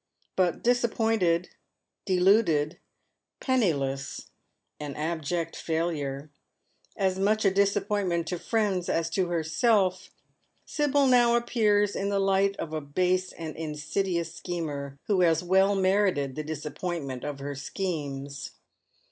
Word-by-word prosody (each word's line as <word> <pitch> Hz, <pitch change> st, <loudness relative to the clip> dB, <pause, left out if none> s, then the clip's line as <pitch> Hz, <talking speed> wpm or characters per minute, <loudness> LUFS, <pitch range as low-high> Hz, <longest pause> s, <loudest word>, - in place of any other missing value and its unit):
But 180 Hz, -3 st, +1 dB
disappointed, 225 Hz, -7 st, +2 dB, 0.6 s
deluded, 180 Hz, -5 st, +3 dB, 0.6 s
penniless, 140 Hz, -, -1 dB, 0.5 s
an 145 Hz, -2 st, -5 dB
abject 165 Hz, +1 st, -2 dB
failure 155 Hz, -4 st, -2 dB, 0.3 s
— -, -, -35 dB
as 190 Hz, 0 st, -2 dB
much 215 Hz, +2 st, +2 dB
a 195 Hz, -, +5 dB
disappointment 200 Hz, -3 st, +1 dB
to 180 Hz, -, -2 dB
her -, -, -18 dB
friends 205 Hz, -6 st, 0 dB
as 165 Hz, 0 st, 0 dB
to 185 Hz, +1 st, +1 dB
herself 185 Hz, +4 st, +1 dB, 0.3 s
— -, -, -44 dB
Sibyl 290 Hz, -2 st, +2 dB
now 240 Hz, -2 st, +5 dB
appears 210 Hz, -4 st, +2 dB
in 200 Hz, -, -1 dB
the 200 Hz, -, 0 dB
light 195 Hz, 0 st, +2 dB
of 155 Hz, -, -5 dB
a 155 Hz, -, -2 dB
base 180 Hz, +5 st, 0 dB
and 160 Hz, -2 st, -7 dB
insidious 165 Hz, +2 st, -2 dB
schemer, 145 Hz, -6 st, -5 dB
who 195 Hz, -3 st, +2 dB
has 165 Hz, -1 st, +3 dB
well 190 Hz, +3 st, +3 dB
merited 190 Hz, -8 st, +2 dB
the 155 Hz, -, -3 dB
disappoint 155 Hz, +2 st, -4 dB
ment 130 Hz, -2 st, -6 dB
of 145 Hz, -1 st, -4 dB
her 140 Hz, +1 st, -5 dB
schemes. 140 Hz, -3 st, -4 dB
180 Hz, 130 wpm, -27 LUFS, 155-200 Hz, 0.6 s, a